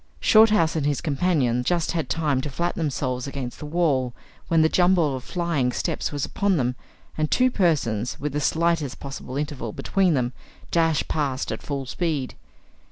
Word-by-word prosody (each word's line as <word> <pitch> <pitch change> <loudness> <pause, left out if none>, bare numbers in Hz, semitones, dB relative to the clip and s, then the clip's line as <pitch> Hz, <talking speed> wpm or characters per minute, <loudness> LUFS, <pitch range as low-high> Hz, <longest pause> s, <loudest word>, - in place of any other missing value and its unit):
Shorthouse 215 -7 +5
and 155 - 0
his 145 -1 +1
companion 140 -6 +1
just 170 +4 0
had 165 -2 -2
time 150 -5 +1
to 150 - -4
flatten 170 +6 -2
themselves 130 -4 -2
against 135 -3 -5
the 150 - -6
wall 145 -7 +1 0.3
when 165 -1 +4
the - - +5
jumble 175 -4 +3
of 130 - -6
flying 165 -8 -1
steps - - -2
was 145 -1 -2
upon 200 -3 0
them, 125 -2 0 0.4
and 155 -1 +1
two 255 0 +3
persons, 135 - 0
with 145 0 -3
the 150 - -1
slightest 160 -3 0
possible 135 -1 -6
interval 140 -7 -4
between 190 -5 +1
them, 125 -1 0 0.4
dashed 165 -3 +2
past 140 -3 -1
at - - -4
full 140 -2 -4
speed. 145 -1 -2
150 Hz, 170 wpm, -24 LUFS, 130-170 Hz, 0.4 s, Shorthouse